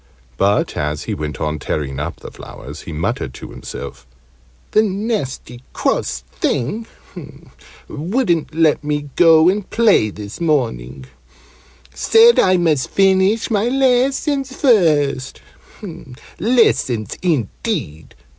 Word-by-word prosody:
But, 100 +9 +1
as 75 0 -2
he - - -4
went 75 -1 -5
on 75 0 -2
tearing 70 -2 -3
up 75 - -5
the - - -9
flowers, - - -10
he - - -9
muttered 80 +1 -3
to - - -10
himself 70 -1 -9 0.6
"The 215 - +4
nasty 195 - -3
cross 65 - -1
thing 215 - -2 1.0
wouldn't 170 - -1
let 160 -3 +2
me 145 -1 -3
go 165 -2 +6
and 195 +1 0
play 215 - +3
this 105 - -9
morning, 70 - -1 0.9
said 460 +1 +5
I 185 -1 +4
must 160 -6 +1
finish 195 +4 +2
my 215 +2 +1
lessons 270 +1 +1
first 155 - +2 1.0
lessons, 155 - +1
indeed! 140 - -3
160 Hz, 110 wpm, -18 LUFS, -, 1.0 s, go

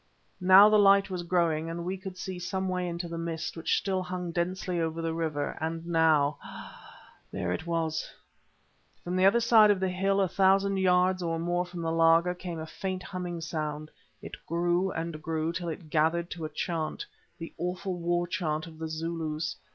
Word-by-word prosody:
Now 190 +2 +8
the 215 0 +5
light 195 -1 +5
was 180 -1 -3
growing, 170 -2 0
and 170 +1 -5
we 185 +2 -2
could 190 -1 -8
see 185 -1 -5
some 190 +1 -2
way 180 -1 -1
into 170 0 -4
the 165 0 -5
mist 165 -1 -4
which 165 - 0
still 190 -2 -1
hung 180 -1 -4
densely 180 +1 -2
over 160 0 -2
the 165 -1 -2
river, 155 -3 -2
and 165 +1 -3
now—ah! 155 -4 0 0.3
there 90 0 -2
it 160 - -5
was. 160 -1 -1 0.9
From 175 +1 -3
the 185 +1 +3
other 230 +4 +4
side 225 -2 +6
of 205 -2 +3
the 190 0 0
hill, 195 +2 +1
a 195 - +3
thousand 195 +1 +3
yards 185 0 +3
or 165 -1 -1
more 175 +2 -1
from 175 -1 -7
the 165 - -1
laager, 165 +2 +4
came 180 -1 -6
a 160 - -5
faint 185 +2 -5
humming 180 -3 -5
sound. 155 -1 -4 0.3
It - - -7
grew 175 +3 +1
and 160 -1 -4
grew 160 0 -2
till 175 0 -3
it 160 -1 -8
gathered 165 +2 +1
to 165 -3 -5
a - - -4
chant—the 165 +1 -5
awful 180 +1 -3
war 175 +1 0
chant 155 -2 -2
of 160 -2 -13
the 160 - -3
Zulus. 160 0 -3
170 Hz, 190 wpm, -28 LUFS, 165-185 Hz, 0.9 s, Now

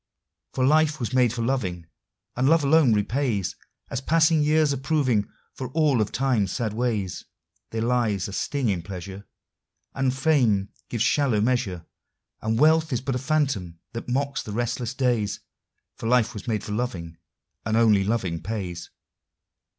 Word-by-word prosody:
For 130 - +2
life 155 +1 +3
was 120 -1 -3
made 125 -3 +4
for 120 -1 -3
loving, 95 -10 -2 0.5
and 130 +3 +2
love 165 -1 +4
alone 145 -2 +5
repays, 110 -1 0 0.4
As - - -2
passing 160 +1 +3
years 150 -1 +3
are - - -2
proving, 130 -6 +1 0.2
for 130 -2 -6
all 150 -7 +3
of 105 - -1
Time's 120 -8 +1
sad 110 -3 -2
ways. 110 -6 -2 0.5
There 110 0 -2
lies 115 -5 +1
a 100 - -8
sting 135 +2 -1
in 95 -4 0
pleasure, 95 +2 -8 0.7
And 135 -1 +1
fame 125 -8 +2 0.2
gives 115 -2 0
shallow 135 -7 +2
measure, 105 -7 0 0.6
And 110 +1 0
wealth 160 +3 +4
is 125 - 0
but 135 +1 -2
a 125 - -1
phantom 135 - -1 0.2
that 115 +1 -6
mocks 140 +2 -1
the 105 - -7
restless 120 +1 -2
days, 120 -6 0 0.6
For 115 - -5
life 125 -2 +3
was 105 +1 -8
made 110 -3 -1
for - - -6
loving, 95 -8 -3 0.5
and 110 +1 0
only 110 -4 +4
loving 95 -6 -1
pays. 90 -3 -5
120 Hz, 160 wpm, -25 LUFS, 105-135 Hz, 0.7 s, alone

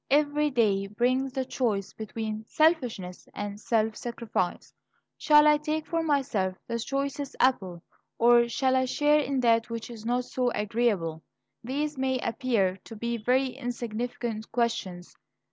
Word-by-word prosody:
Every 295 +1 +3
day 205 -7 +2
brings 250 +5 0
the 265 -1 -1
choice 215 -7 -1
between 220 0 -5
selfishness 250 - 0
and 205 0 -5
self 220 -1 +1
sacrifice. 230 -6 -3 0.4
Shall 300 -1 +5
I 300 0 +6
take 305 +1 -2
for 330 -1 -1
myself 265 -12 0
the 235 - -2
choicest 275 +3 -3
apple? 190 -9 +1 0.3
or 235 0 +5
shall 260 +1 +1
I 260 0 +3
share 295 +3 +3
in 275 -2 0
that 230 -1 +3
which 230 0 -5
is 225 -2 -9
not 245 +2 0
so 250 -1 0
agreeable? 210 -7 0 0.4
These 285 +3 -2
may 260 0 +1
appear 230 -6 0
to 225 - -9
be 235 +2 -2
very 255 +4 +2
insignificant 240 -2 -4
questions. 190 -7 -2
240 Hz, 145 wpm, -27 LUFS, 215-270 Hz, 0.4 s, I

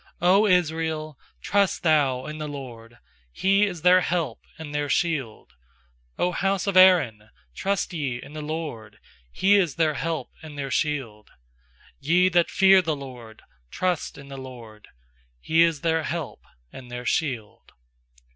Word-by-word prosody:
90 195 +4 +4
Israel, 160 -3 -1 0.2
trust 200 -2 +1
thou 140 -6 +2
in 155 0 -7
the 155 - -4
LORD! 120 -5 -9 0.3
He 195 - +2
is 175 -5 -7
their 180 +1 +6
help 170 -2 -2 0.2
and 155 -2 -8
their 145 -1 -2
shield! 135 - -2 0.6
100 180 0 -1
house 195 +1 0
of 200 -2 -1
Aaron, 150 - +5 0.2
trust 195 - -2
ye 135 -7 -3
in 145 - -12
the 155 - -6
LORD! 150 -9 -6 0.3
He 200 - +3
is 175 -8 +1
their 160 -2 +1
help 160 -4 -4
and 155 -2 -10
their 135 -2 -4
shield! 130 -10 -2 0.7
nYe 175 +6 +3
that 175 -1 +3
fear 190 0 +5
the 160 -3 -2
LORD, 125 -5 -11 0.3
trust 180 - -2
in 140 -1 -12
the 135 0 -9
LORD! 120 -5 -11 0.5
He 160 - +2
is 165 -3 +2
their 160 -1 +1
help 155 -2 -5 0.3
and 125 -2 -11
their 125 0 -7
shield. 125 -10 -3
155 Hz, 150 wpm, -24 LUFS, 130-175 Hz, 0.7 s, their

